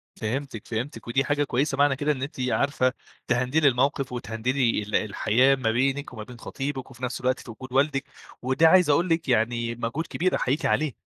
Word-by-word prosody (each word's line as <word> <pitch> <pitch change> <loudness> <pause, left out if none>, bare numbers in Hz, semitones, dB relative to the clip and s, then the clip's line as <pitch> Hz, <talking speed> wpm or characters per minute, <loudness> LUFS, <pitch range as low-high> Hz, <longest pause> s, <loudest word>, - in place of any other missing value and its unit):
فهمتِك، 115 0 -4
فهمتِك، 120 +6 -5
ودي 135 +3 +1
حاجة 145 +1 +1
كويسة، 135 +1 0
معنى 145 -1 +4
كده 145 +3 0
إن 130 - -3
أنتِ 140 0 -5
عارفة 130 -2 +1 0.3
تهندلي 130 +5 +2
الموقف، 135 +1 +1
وتهندلي 120 +1 0
ال 105 +1 -4
الحياة 110 +5 +3
ما 120 -4 0
بينِك 135 +3 0
وما 110 -3 -7
بين 120 +1 -12
خطيبِك، 135 0 -5
وفي 125 0 -14
نفْس 125 0 -3
الوقت 130 +1 +1
في 120 - -9
وجود 130 +3 -10
والدِك، 135 0 +2 0.4
وده 130 +6 +3
عايز 180 -1 +5
أقول 170 +5 +3
لِك 165 -3 0
يعني 115 0 +1
مهجود 120 +8 -3
كبير 185 +2 0
أحييكِ 140 +6 0
عليه. 155 -4 +1
130 Hz, 190 wpm, -25 LUFS, 120-145 Hz, 0.4 s, عايز